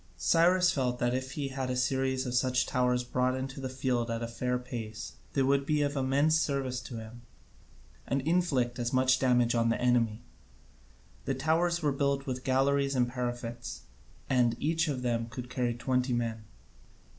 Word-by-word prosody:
Cyrus 180 +2 +4
felt 125 -3 -1
that 120 0 0
he 130 +2 -3
had 130 -1 -3
a 125 - -1
series 130 +1 0
of 125 - -3
such 125 0 +2
towers 125 -1 +1
brought 125 +1 0
into 135 +1 -5
the 130 - -3
field 125 -2 -1
at 115 0 -2
a - - -2
fair 125 +2 -1
pace 115 -3 -6 0.2
they 135 - +2
would 140 +1 +2
be 150 +1 +1
of 145 0 -1
immense 140 +4 +2
service 135 -4 -1
to 125 - -8
him, 110 +2 -9 0.9
and 135 0 0
inflict 135 -6 +1
as 120 0 -1
much 130 0 +3
damage 125 -2 +3
on 115 -1 +2
the 115 - 0
enemy. 120 -2 +1 1.0
The 135 - -1
towers 165 +5 +1
were 145 - +3
built 140 0 0
with 130 -1 -4
galleries 140 +1 +2
and 125 -1 +3
parapets, 120 -1 -5 0.5
and 120 -2 +2
each 165 +2 +1
of 130 -4 -2
them 115 -2 0
could 125 +2 -8
carry 125 -2 -1
twenty 125 +1 0
men. 115 -2 -2
130 Hz, 175 wpm, -30 LUFS, 120-140 Hz, 1.0 s, Cyrus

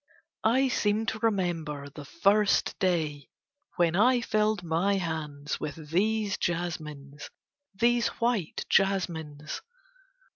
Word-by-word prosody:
I 260 +4 +3
seem 215 -3 +1
to 220 - -2
remember 175 -10 -1
the 145 +1 -10
first 200 +7 +2
day 160 -7 0 0.5
when 170 -1 +2
I 245 +6 +4
filled 215 -3 +1
my 170 +5 +1
hands 155 -5 -3
with 155 0 -6
these 210 +3 +1
jasmines, 150 -5 -4 0.5
these 235 +3 +3
white 230 -8 -1
jasmines. 160 -6 0
175 Hz, 105 wpm, -28 LUFS, 155-215 Hz, 0.5 s, I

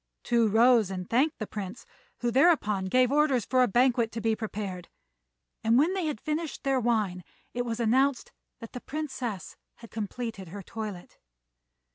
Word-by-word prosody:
Tou 235 -2 +3
rose 225 -1 +4
and 185 -1 -5
thanked 280 +7 +2
the 215 - -4
Prince, 205 +2 -7 0.4
who 240 -1 0
thereupon 235 - +3
gave 250 +6 +3
orders 280 -5 +2
for 255 -1 +2
a 250 - +5
banquet 240 0 +2
to 230 - -3
be 225 0 +1
prepared; 200 -5 -5 0.7
and 225 +2 +4
when 315 +7 +3
they 375 -4 -1
had 295 -8 -3
finished 310 +3 -3
their 270 -1 +2
wine 215 -7 0 0.3
it 245 0 -2
was 230 -1 -3
announced 255 +3 +2 0.3
that 230 - -10
the 250 - -6
Princess 265 - -5 0.2
had 230 - -14
completed 220 -2 -5
her 200 +3 -8
toilet. 210 -3 -7
235 Hz, 165 wpm, -28 LUFS, 210-260 Hz, 0.7 s, a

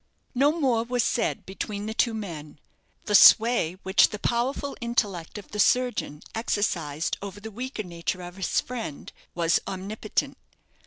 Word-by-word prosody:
No 275 +3 +4
more 265 -8 +1
was 245 +1 0
said 230 - -1
between 200 +2 -5
the 220 - -3
two 230 0 +1
men. 155 -9 -7 0.5
The 210 - -2
sway 220 -4 +7
which 190 +1 +5
the 210 - -5
powerful 250 +6 -1
intellect 210 -8 -2
of 205 - -10
the 210 - -5
surgeon 245 -11 +1
exercised 175 -9 -1
over 200 0 -7
the 220 +2 -8
weaker 245 +1 -5
nature 175 0 -4
of 175 +1 -9
his 190 - 0
friend 230 - -7 0.2
was 170 -1 +2
omnipotent. 200 +3 -3
210 Hz, 150 wpm, -26 LUFS, 180-235 Hz, 0.5 s, sway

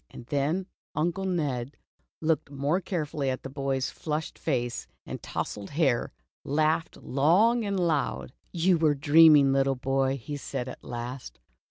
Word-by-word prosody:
And 120 - -11
then 145 +8 0 0.3
Uncle 175 +5 0
Ned, 145 -8 -2 0.4
looking 155 -3 -1
more 145 +7 +1
carefully 155 -6 -2
at 130 - -3
the 135 - -7
boy's 135 -2 -1
flushed 155 0 -4
face, 120 -5 -2 0.2
and - - -6
tousled 100 -1 -4
hair, 140 -5 +1 0.3
laughed 155 +3 0
long 190 - +3
and 200 -2 -1
loud. 155 -6 -1 0.2
"You 175 0 +2
were 155 -2 +3
dreaming, 150 -1 +6
little 135 0 +2
boy," 135 +1 0
he 145 +4 -6
said, 130 -2 -4
at - - -9
last. 120 - -6
145 Hz, 145 wpm, -27 LUFS, 135-165 Hz, 0.4 s, dreaming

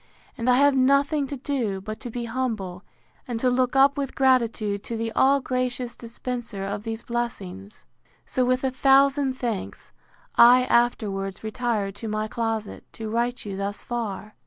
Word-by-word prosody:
—And 230 +2 -1
I 250 - +6
have 280 +1 +4
nothing 280 +2 +3
to 280 - -5
do, 245 -8 -2
but 215 +3 -7
to 245 - -6
be 235 +1 -4
humble, 220 -7 -3 0.4
and 240 -2 -3
to 250 +1 +2
look 250 +1 +1
up 275 +1 +5
with 275 -2 -3
gratitude 230 -6 +2
to 230 - -4
the 225 0 -2
all 275 +4 +4
gracious 250 -1 -2
dispenser 235 -3 -5
of 200 +1 -3
these 225 +1 -5
blessings. 205 -5 -5 0.4
So, 255 - 0
with 255 +1 +1
a 265 - +1
thousand 270 +1 +4
thanks, 235 -6 -5 0.4
I 245 +2 +8
afterwards 205 -6 0
retired 220 -3 -1
to 225 - -6
my 215 0 -2
closet, 225 -2 -3
to 220 -1 -6
write 240 +1 -1
you 200 -2 -4
thus 200 +1 -4
far. 215 -3 -4
235 Hz, 165 wpm, -25 LUFS, 215-255 Hz, 0.4 s, I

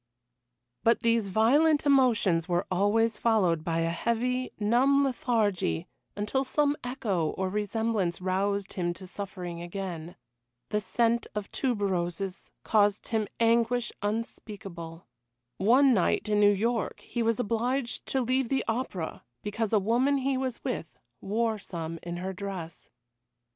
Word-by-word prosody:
But 230 - +3
these 230 -2 +2
violent 285 +10 +4
emotions 225 - +3
were 175 +2 +1
always 210 +4 +2
followed 185 -9 +2
by 165 -1 0
a 165 0 0
heavy, 250 +7 -1
numb 255 +6 +4
lethargy 210 - 0 0.3
until 210 +6 0
some 290 +2 +1
echo 215 -10 -1
or 190 0 0
resemblance 210 -2 -1
roused 195 +2 -1
him 175 -3 -1
to 185 - -10
suffering 180 -3 -6
again. 175 -2 -6 0.5
The 210 0 0
scent 235 +3 +1
of 210 -1 -4
tuberoses 195 -6 -2
caused 205 -1 +2
him 220 -3 0
anguish 230 0 +2
unspeakable. 200 -6 -5 0.5
One 255 +7 +5
night 190 -1 +1
in 210 -1 +2
New 205 0 +7
York 225 +3 -1
he 240 - -4
was 230 +1 +1
obliged 245 +3 -1
to 265 - 0
leave 255 0 +1
the 270 -1 0
opera 225 -8 -3 0.2
because 210 +1 -2
a 220 - +4
woman 240 +8 +2
he 270 0 0
was 260 -2 -3
with 245 -11 -4 0.2
wore 220 +2 0
some 165 -4 -5
in 175 0 -5
her 190 +2 -4
dress. 185 -4 -7
210 Hz, 135 wpm, -28 LUFS, 185-235 Hz, 0.5 s, New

